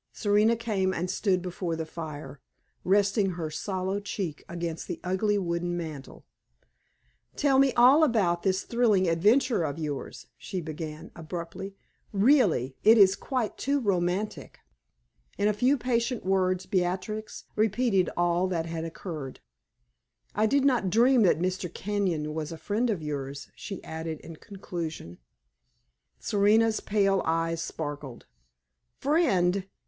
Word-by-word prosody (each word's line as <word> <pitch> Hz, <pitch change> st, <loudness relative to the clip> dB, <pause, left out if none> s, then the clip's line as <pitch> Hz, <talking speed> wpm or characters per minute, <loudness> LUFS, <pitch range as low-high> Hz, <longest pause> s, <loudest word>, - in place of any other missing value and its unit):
Serena 210 Hz, +2 st, +3 dB
came 200 Hz, -5 st, -1 dB
and 180 Hz, +2 st, -2 dB
stood 185 Hz, -4 st, 0 dB
before 175 Hz, -2 st, -3 dB
the 160 Hz, 0 st, -4 dB
fire, 155 Hz, -3 st, -8 dB, 0.4 s
resting 200 Hz, 0 st, +2 dB
her 160 Hz, -3 st, -4 dB
sallow 190 Hz, +3 st, -2 dB
cheek 195 Hz, -6 st, -5 dB
against 170 Hz, -1 st, -4 dB
the -, -, -5 dB
ugly 195 Hz, +3 st, +1 dB
wooden 175 Hz, -1 st, -2 dB
mantel. 155 Hz, -5 st, -7 dB, 1.1 s
"Tell 275 Hz, -2 st, +3 dB
me 275 Hz, -1 st, +5 dB
all 260 Hz, +6 st, +6 dB
about 195 Hz, -, +2 dB
this 190 Hz, 0 st, 0 dB
thrilling 220 Hz, -6 st, +2 dB
adventure 210 Hz, +8 st, +3 dB
of 150 Hz, -1 st, -3 dB
yours," 150 Hz, -4 st, -5 dB
she 190 Hz, -, -4 dB
began, 155 Hz, 0 st, -7 dB
abruptly; 175 Hz, +4 st, -7 dB, 0.4 s
"really, 200 Hz, -, +3 dB
it 225 Hz, +2 st, +7 dB
is 195 Hz, -2 st, +6 dB
quite 250 Hz, -4 st, -3 dB
too 280 Hz, +1 st, +1 dB
romantic!" 195 Hz, -1 st, -1 dB, 0.8 s
In 205 Hz, -, +2 dB
a 210 Hz, -, +3 dB
few 250 Hz, +7 st, +2 dB
patient 240 Hz, -2 st, -1 dB
words 185 Hz, -1 st, +1 dB
Beatrix 190 Hz, +4 st, -2 dB
repeated 215 Hz, -3 st, +2 dB
all 175 Hz, +1 st, +2 dB
that 170 Hz, -3 st, -2 dB
had 165 Hz, -1 st, -4 dB
occurred. 160 Hz, -4 st, -7 dB, 0.9 s
"I 215 Hz, +1 st, +2 dB
did 280 Hz, +4 st, +2 dB
not 245 Hz, -8 st, +2 dB
dream 240 Hz, +5 st, +4 dB
that 185 Hz, -7 st, +4 dB
Mr. 180 Hz, 0 st, -2 dB
Kenyon 185 Hz, -8 st, -2 dB
was 155 Hz, 0 st, -4 dB
a 165 Hz, -, -6 dB
friend 210 Hz, +10 st, -1 dB
of 190 Hz, -8 st, -2 dB
yours," 140 Hz, -1 st, -5 dB
she 200 Hz, -3 st, -8 dB
added, 160 Hz, -1 st, -5 dB
in 165 Hz, -1 st, -10 dB
conclusion. 170 Hz, -, -7 dB, 1.0 s
Serena's 215 Hz, +2 st, +3 dB
pale 195 Hz, -2 st, +1 dB
eyes 165 Hz, 0 st, 0 dB
sparkled. 145 Hz, -7 st, -6 dB, 0.7 s
"Friend? 200 Hz, -, +2 dB
185 Hz, 135 wpm, -27 LUFS, 165-215 Hz, 1.1 s, it